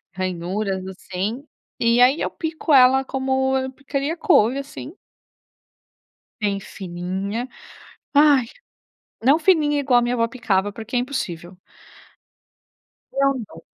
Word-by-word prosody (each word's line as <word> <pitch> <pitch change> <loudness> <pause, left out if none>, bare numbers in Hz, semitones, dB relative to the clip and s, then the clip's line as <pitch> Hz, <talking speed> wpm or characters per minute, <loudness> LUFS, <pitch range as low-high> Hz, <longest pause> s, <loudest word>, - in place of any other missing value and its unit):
ranhuras, 185 +1 -3
assim. 195 +7 -5 0.4
E 235 +1 +3
aí 265 +6 +5
eu - - 0
pico 320 -1 -4
ela 265 0 +6
como 265 0 0
eu 260 0 -3
picaria 280 +3 -3
couve, 275 - +3
assim. 285 +4 -9 1.5
Bem 200 -1 0
fininha, 190 +5 -5 0.7
ai, 285 -3 +5 0.8
não 275 +6 +5
fininha 310 -4 +3
igual 265 -3 +3
a - - +2
minha 240 +1 0
vó 230 - +2
picava 205 -5 -1
porque 225 +4 -6
é - - +4
impossível. 180 -9 -4 1.6
É 275 0 +2
um 275 -1 +1
dom 165 -4 -14
250 Hz, 120 wpm, -22 LUFS, 195-275 Hz, 1.6 s, ela